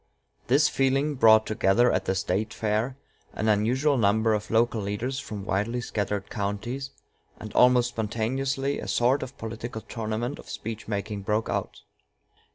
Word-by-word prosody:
This 140 +5 +4
feeling 135 +2 +1
brought 110 -4 +6
together 110 +2 +3
at - - 0
the 95 - 0
State 95 +4 -1
fair 110 +5 -1 0.4
an 110 - -2
unusual 125 +7 +2
number 110 +1 +3
of 105 0 -2
local 115 0 +2
leaders 110 +7 -3
from 105 -6 -7
widely 105 +5 -1
scattered 105 -3 -3
counties, 115 +6 -3 0.5
and 110 - -8
almost 125 -1 +5
spontaneously 130 +5 -1
a - - -6
sort 125 +4 +2
of 130 - -7
political 115 0 -6
tournament 115 +4 -4
of - - -12
speech 110 0 -6
making 105 -1 -3
broke 105 +3 -1
out. - - -3
110 Hz, 150 wpm, -26 LUFS, 105-125 Hz, 0.5 s, brought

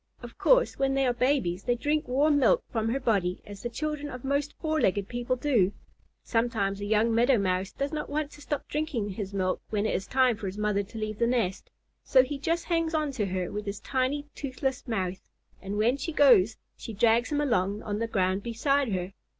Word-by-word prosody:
Of - - -9
course, - - +3
when 270 0 +1
they 270 0 +2
are 245 - +2
babies, 240 -8 +1
they 245 +4 0
drink 295 +5 -1
warm 285 +4 +3
milk - - +4
from 225 -2 0
her 260 +4 0
body 190 -7 0
as 200 -1 -10
the 240 - -3
children 295 +4 -3
of 250 -3 -8
most 280 +2 -1
four 315 -1 -1
legged 195 +1 +1
people 245 +1 -2
do. 240 -8 +2 0.5
Sometimes 220 -4 0
a - - -3
young 220 +2 +2
Meadow 240 +3 +4
Mouse 185 -1 0
does 280 +2 -3
not 300 - -3
want 295 0 -2
to 295 - -14
stop 285 +1 -4
drinking 290 -9 -2
his 195 0 -5
milk 185 -2 -1
when 210 -1 0
it - - 0
is 190 - -2
time 255 -4 +3
for 205 - -5
his 190 +2 -6
mother 210 -1 +1
to 205 +3 -10
leave 215 -1 -4
the 235 - +3
nest, 225 -7 -1 0.3
so 260 -1 +5
he 280 +2 -5
just 330 +4 -1
hangs 330 -2 0
on 305 -2 0
to 220 -7 -2
her 185 -1 -2
with 210 0 -5
his 200 0 -4
tiny, 270 +2 -1
toothless 265 -1 -3
mouth, 190 -5 -2 0.4
and 200 +1 -4
when 235 +5 +2
she 280 +4 -4
goes 245 - +5 0.2
she 225 - -8
drags 230 +4 +3
him 295 - +1
along 205 -7 0
on 210 0 -3
the 230 - -1
ground 190 -2 0
beside 265 +3 0
her. 185 +1 -3
235 Hz, 220 wpm, -28 LUFS, 205-280 Hz, 0.5 s, so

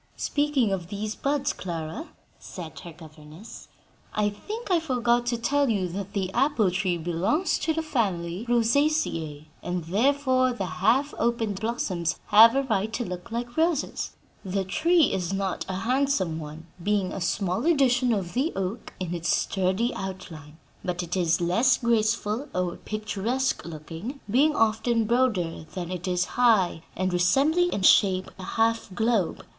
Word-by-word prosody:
"Speaking 290 -7 +1
of 180 -3 -2
these 210 +2 -4
buds, 285 +2 -1
Clara," 170 - -5 0.3
said 170 -4 -9
her 170 - -9
governess, 155 +4 -13 0.5
"I 210 -1 +1
think 420 - -7
I 350 - +4
forgot 245 -5 +1
to 240 -1 0
tell 280 +3 +1
you 195 -5 0
that 200 +2 -6
the 190 -2 -2
apple 245 -7 +2
tree 180 -1 0
belongs 175 - 0
to 320 - 0
the 320 - -1
family 195 - -2
Rosaceae, 230 - +1 0.2
and 180 -1 -3
therefore 255 - +2
the 200 -5 -3 0.2
half 260 +8 +3
opened 225 -4 0
blossoms 185 -7 -2
have 225 +3 +8
a 275 - +2
right 220 -4 -1
to 240 - -2
look 180 +2 -7
like 240 +1 -4
roses. 325 -2 0 0.3
The 195 0 -1
tree 320 - +3
is 180 0 -2
not 195 -1 -2
a 185 - -2
handsome 225 - 0
one, 155 +1 -9 0.2
being 200 -1 0
a 195 - -5
small 190 - -1
edition 260 -6 +3
of 190 -6 -2
the 270 +7 0
oak 195 +4 -4
in 180 -2 -3
its 165 -2 -3
sturdy 190 +8 +1
outline, 170 -6 -8 0.3
but 180 -1 -2
it 175 +1 -4
is 175 -3 +2
less 225 +9 +3
graceful 230 +2 0
or 180 -1 -1
picturesque 215 +5 -2
looking, 165 - -7
being 285 +8 +3
often 225 +1 +2
broader 210 -10 0
than 180 -1 -4
it 180 0 -4
is 180 0 +1 0.2
high 205 -9 +4
and 185 0 -1
resembling 285 - +3
in 195 - -2
shape 185 -1 +4
a - - -7
half 225 +3 0
globe. 220 -4 0
210 Hz, 155 wpm, -26 LUFS, 180-250 Hz, 0.5 s, have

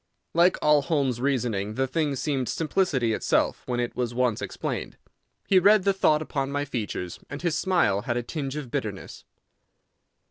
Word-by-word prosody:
Like 175 +2 +4
all 150 -1 +5
Holmes's 140 -5 0
reasoning 115 -7 -1
the 135 - +1
thing 145 +1 -1
seemed 135 -2 -1
simplicity 150 - 0
itself - - +1
when 125 -1 -1
it 120 0 -2
was 120 -1 -2
once 125 -3 +1
explained. - - -4 0.5
He 190 - +5
read 205 +2 +5
the 200 0 +3
thought 155 -5 +2
upon 135 -2 -3
my 145 0 -1
features, 105 - -4
and 145 +4 -7
his 170 -3 +1
smile 170 - +2
had 120 +2 -2
a 120 - -1
tinge 140 +1 -4
of 145 -6 -6
bitterness. - - -5
135 Hz, 170 wpm, -26 LUFS, 120-155 Hz, 0.5 s, all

